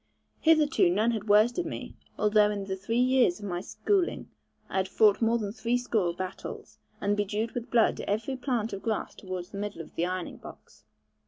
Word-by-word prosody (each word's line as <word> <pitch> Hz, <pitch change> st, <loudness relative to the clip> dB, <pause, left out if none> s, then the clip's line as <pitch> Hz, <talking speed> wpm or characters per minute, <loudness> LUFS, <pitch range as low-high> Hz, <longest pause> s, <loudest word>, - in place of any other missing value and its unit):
Hitherto 315 Hz, -, +4 dB
none 215 Hz, +6 st, +2 dB
had 215 Hz, -2 st, -4 dB
worsted 235 Hz, +10 st, +4 dB
me, -, -, -6 dB, 0.2 s
although 210 Hz, 0 st, +4 dB
in 200 Hz, -1 st, -3 dB
the 190 Hz, -1 st, -3 dB
three 195 Hz, +5 st, -2 dB
years 250 Hz, -7 st, +3 dB
of 210 Hz, -, -8 dB
my 175 Hz, -2 st, -3 dB
schooling, 380 Hz, -, -1 dB, 0.4 s
I -, -, -4 dB
had 190 Hz, 0 st, +1 dB
fought 210 Hz, +1 st, +4 dB
more 230 Hz, +1 st, +3 dB
than 205 Hz, -3 st, -4 dB
threescore 230 Hz, -5 st, 0 dB
battles, 185 Hz, +1 st, -7 dB, 0.2 s
and 205 Hz, +1 st, +1 dB
bedewed 210 Hz, +2 st, -1 dB
with 240 Hz, -1 st, -5 dB
blood 230 Hz, -2 st, +3 dB
every 220 Hz, +6 st, -1 dB
plant 245 Hz, -4 st, -2 dB
of 195 Hz, -, -5 dB
grass 220 Hz, -2 st, -2 dB
towards 185 Hz, -2 st, -6 dB
the 200 Hz, -, -6 dB
middle 205 Hz, -3 st, -4 dB
of -, -, -16 dB
the 170 Hz, -, 0 dB
Ironing 185 Hz, -1 st, -4 dB
box. -, -, -14 dB
210 Hz, 185 wpm, -28 LUFS, 195-235 Hz, 0.4 s, Hitherto